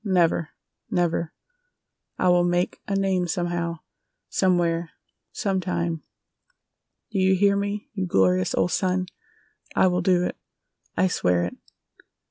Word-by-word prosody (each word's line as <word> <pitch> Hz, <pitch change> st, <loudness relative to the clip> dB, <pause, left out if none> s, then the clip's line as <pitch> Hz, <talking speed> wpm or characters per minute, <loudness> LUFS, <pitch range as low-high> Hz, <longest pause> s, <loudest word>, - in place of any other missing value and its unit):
Never! 175 Hz, -5 st, +2 dB, 0.4 s
Never! 170 Hz, -2 st, 0 dB, 0.9 s
I -, -, +1 dB
will 175 Hz, 0 st, +5 dB
make 175 Hz, +1 st, 0 dB
a 200 Hz, -, -1 dB
name 190 Hz, -2 st, +1 dB
somehow, 170 Hz, -1 st, -2 dB, 0.5 s
somewhere, 170 Hz, -3 st, +1 dB, 0.4 s
some 195 Hz, -5 st, -1 dB
time! 170 Hz, -2 st, -2 dB, 1.1 s
Do 200 Hz, -, -1 dB
you 190 Hz, 0 st, +4 dB
hear 200 Hz, +1 st, +4 dB
me, 200 Hz, +1 st, -3 dB
you 190 Hz, -3 st, -2 dB
glorious 95 Hz, -, +2 dB
old 180 Hz, -, +1 dB
sun? 185 Hz, -1 st, +1 dB, 0.7 s
I -, -, +5 dB
will 180 Hz, -1 st, +2 dB
do 180 Hz, 0 st, +3 dB
it! -, -, -2 dB, 0.6 s
I -, -, +4 dB
swear 90 Hz, -, +1 dB
it!" 90 Hz, -, -3 dB
180 Hz, 125 wpm, -25 LUFS, 170-190 Hz, 1.1 s, will